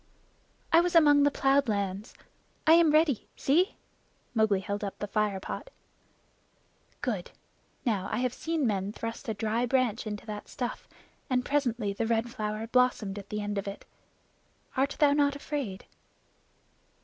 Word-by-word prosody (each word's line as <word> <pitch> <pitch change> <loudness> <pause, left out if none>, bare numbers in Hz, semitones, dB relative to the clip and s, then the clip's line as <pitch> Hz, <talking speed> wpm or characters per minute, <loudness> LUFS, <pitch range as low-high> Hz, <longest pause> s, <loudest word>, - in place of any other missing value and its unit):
"I 335 - +8
was 350 0 -1
among 295 -3 +7
the 285 - +5
plowed 275 -1 +2
lands. 200 0 -2 0.5
I 315 - +7
am 335 -1 +6
ready. 305 -5 +3
See!" 350 - +2 0.6
Mowgli 220 -4 +2
held 200 +2 -4
up 200 - -4
the - - -3
fire 205 -1 0
pot. - - -6 1.3
"Good! 210 -8 -2 0.6
Now, 200 -6 0
I 215 - 0
have 250 0 0
seen 320 -1 -1
men 200 -2 -1
thrust 230 0 -5
a 220 - -1
dry 225 +4 0
branch 245 -3 +1
into 210 0 -5
that 210 -1 -6
stuff, 245 -2 -5 0.4
and 250 -1 +1
presently 240 -8 0
the 225 +3 -2
Red 230 +1 0
Flower 215 0 -3
blossomed 230 -5 +1
at 200 - -12
the 210 0 -3
end 205 -1 -2
of 195 - -6
it. 200 - -7 0.9
Art 275 +2 +1
thou 290 -2 +5
not 285 -1 +2
afraid?" 280 -9 -4
230 Hz, 155 wpm, -29 LUFS, 205-280 Hz, 1.3 s, I